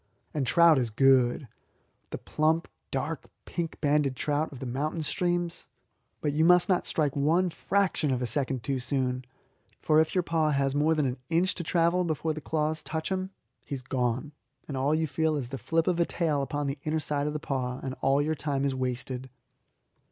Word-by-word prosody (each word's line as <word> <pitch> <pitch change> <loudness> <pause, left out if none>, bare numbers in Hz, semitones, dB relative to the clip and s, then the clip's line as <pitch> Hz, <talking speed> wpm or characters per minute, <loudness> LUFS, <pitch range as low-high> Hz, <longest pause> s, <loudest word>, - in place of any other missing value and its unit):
And 140 -4 -1
trout 165 +3 +6
is 120 -2 0
good 130 +2 +3 0.6
the - - -4
plump, 160 +2 0 0.2
dark, - - -3 0.2
pink 170 -2 -4
banded 145 -2 +2
trout 150 +4 -1
of 140 - -9
the 130 - -5
mountain 150 +6 -2
streams. 175 +1 -1 0.5
But 145 -2 0
you 155 +2 +2
must 180 +2 +6
not 185 -3 +1
strike 150 -4 0
one 165 +6 +2
fraction 190 -3 0
of 130 -2 +1
a 125 - -1
second 130 0 -1
too 135 +3 -1
soon, 125 -1 -1 0.5
for 155 0 +3
if 160 - -2
your 180 - +3
paw 160 -2 +1
has 140 -2 +1
more 150 +3 +3
than 150 -2 +1
an 130 0 -2
inch 175 +3 +2
to 175 - -5
travel 170 +2 +2
before 160 -1 -1
the 155 - -7
claws 155 +1 -1
touch 160 +3 -4
him 190 0 -1 0.3
he 140 - -4
is 130 - -7
gone, 125 +2 -1 0.4
and 140 - -4
all 135 +4 +2
you 160 0 +1
feel 155 +2 0
is 130 -5 -3
the 135 0 -5
flip 165 +7 +1
of 175 -2 +1
a 170 - +4
tail 155 -5 0
upon 145 +1 -2
the 140 +1 -3
inner 155 +1 0
side 145 -1 -1
of 150 - -2
the 150 - -2
paw, 130 -4 -3
and 130 - -3
all 135 +2 +3
your 155 +2 0
time 140 -2 -1
is 140 - +1
wasted. 130 0 -3
150 Hz, 205 wpm, -28 LUFS, 135-160 Hz, 0.6 s, trout